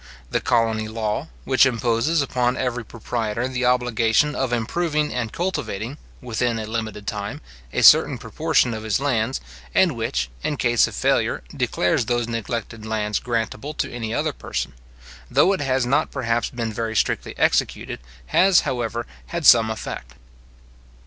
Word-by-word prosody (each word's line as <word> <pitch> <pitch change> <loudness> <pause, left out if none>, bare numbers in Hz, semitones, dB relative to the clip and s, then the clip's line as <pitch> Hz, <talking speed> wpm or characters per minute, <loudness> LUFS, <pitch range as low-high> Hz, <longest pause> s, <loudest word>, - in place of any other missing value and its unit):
The - - +1
colony 115 -2 +1
law, 110 -1 -2 0.2
which 130 - +4
imposes 125 +4 +2
upon 125 -1 0
every 125 -2 -2
proprietor 115 +1 -3
the 130 -1 -2
obligation 125 +2 +2
of 135 -3 -1
improving 150 +6 0
and 120 -3 -2
cultivating, 140 - -3 0.2
within 120 -1 -1
a 110 - -3
limited 110 -2 -4
time, 105 0 -4 0.3
a - - 0
certain - - +7
proportion 120 - +1
of 110 - -5
his 110 -1 0
lands, 130 -3 0 0.4
and - - +4
which, 60 0 -2
in 150 - -1
case 120 -2 +3
of - - -8
failure, - - +1
declares 90 +7 +1
those 120 -1 0
neglected 115 -1 -4
lands 105 -1 -1
grantable 120 +4 -3
to - - -2
any 115 -2 -4
other - - 0
person; - - -4 0.6
though 195 - +4
it 190 - -2
has 130 -2 +1
not 140 +5 +2
perhaps 120 -3 -1
been 115 -3 -4
very 110 +1 -3
strictly - - 0
executed, - - +1 0.3
has, 185 - +5
however, 120 -2 -2 0.2
had 170 -2 -4
some 115 -3 +7
effect. 65 - -6
115 Hz, 150 wpm, -23 LUFS, 110-130 Hz, 0.6 s, certain